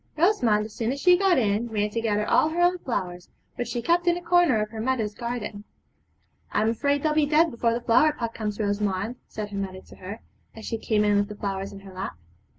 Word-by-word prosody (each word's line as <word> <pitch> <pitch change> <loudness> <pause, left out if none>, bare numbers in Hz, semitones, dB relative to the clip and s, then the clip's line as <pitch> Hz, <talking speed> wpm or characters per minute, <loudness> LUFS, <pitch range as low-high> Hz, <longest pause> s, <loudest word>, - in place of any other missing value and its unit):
Rosamond 250 - +3
as 215 - -10
soon 230 +1 -1
as 275 - -4
she 360 +4 +6
got 380 -1 +3
in 220 -1 +1
ran 210 -1 -1
to 230 - -2
gather 210 -2 0
all 310 - +4
her 330 +2 -3
own 355 +1 +3
flowers, 180 - -4 0.3
which 245 -2 -3
she 235 0 -3
kept 345 +1 +2
in 345 0 +4
a - - -6
corner 345 -8 +4
of 215 0 -2
her 220 -1 -5
mother's 225 -4 -1
garden. 235 -3 -5 0.9
'I - - +1
am 220 - +2
afraid 285 +5 0
they'll 310 -1 +2
be 300 -1 +2
dead 315 +3 +4
before 230 0 0
the 240 - -3
flower 245 +6 +4
pot 230 -6 -4
comes, 210 -1 -4
Rosamond,' 205 +2 -1
said 210 -1 -6
her 200 - -5
mother 190 -1 -5
to - - -16
her, 200 +4 -8 0.3
as 220 - -9
she 225 - -3
came 215 -1 +1
in 205 -1 +3
with 205 0 +1
the 210 - -8
flowers 195 -1 -4
in 195 - -10
her 195 -1 -12
lap. 185 - -5
225 Hz, 245 wpm, -25 LUFS, 205-285 Hz, 0.9 s, she